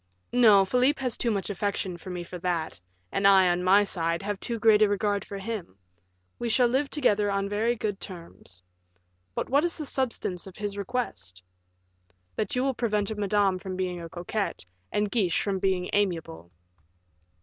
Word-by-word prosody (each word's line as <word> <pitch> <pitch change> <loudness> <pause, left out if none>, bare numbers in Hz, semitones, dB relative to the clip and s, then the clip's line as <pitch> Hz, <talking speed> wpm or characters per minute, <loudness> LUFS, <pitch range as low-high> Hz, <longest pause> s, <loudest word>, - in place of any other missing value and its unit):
"No; 215 -6 +6
Philip 250 +8 +2
has 255 -3 -2
too 235 - -1
much 205 -2 -1
affection 200 -2 -2
for 175 +2 -10
me 180 -1 -4
for 180 +1 -8
that, 170 -2 -2 0.3
and 195 - +3
I, 190 -2 +6
on 175 0 0
my 195 +3 +6
side, 170 -2 -1
have 205 -1 -3
too 235 - -3
great 220 -1 +5
a 210 - +5
regard 205 0 0
for 200 - -7
him; 195 - -6 0.6
we 240 - -2
shall 245 +2 +4
live 265 +4 0
together 210 -8 +2
on 200 0 0
very 220 +4 0
good 210 -3 -3
terms. 165 - -11 0.7
But - - -2
what 285 +3 +3
is 345 -1 -1
the 305 - -4
substance 230 -10 -2
of 190 - -11
his 205 -1 -4
request?" 95 - -4 0.9
"That 210 +1 -2
you 250 - +1
will 270 0 +1
prevent 215 -3 -1
Madame 200 -2 +1
from 185 0 -6
being 180 -2 -3
a 165 - -7
coquette 180 - -3 0.3
and 210 -1 0
Guiche 195 -8 +2
from 195 -2 -1
being 185 -1 0
amiable." 165 - -1
200 Hz, 180 wpm, -27 LUFS, 180-225 Hz, 0.9 s, No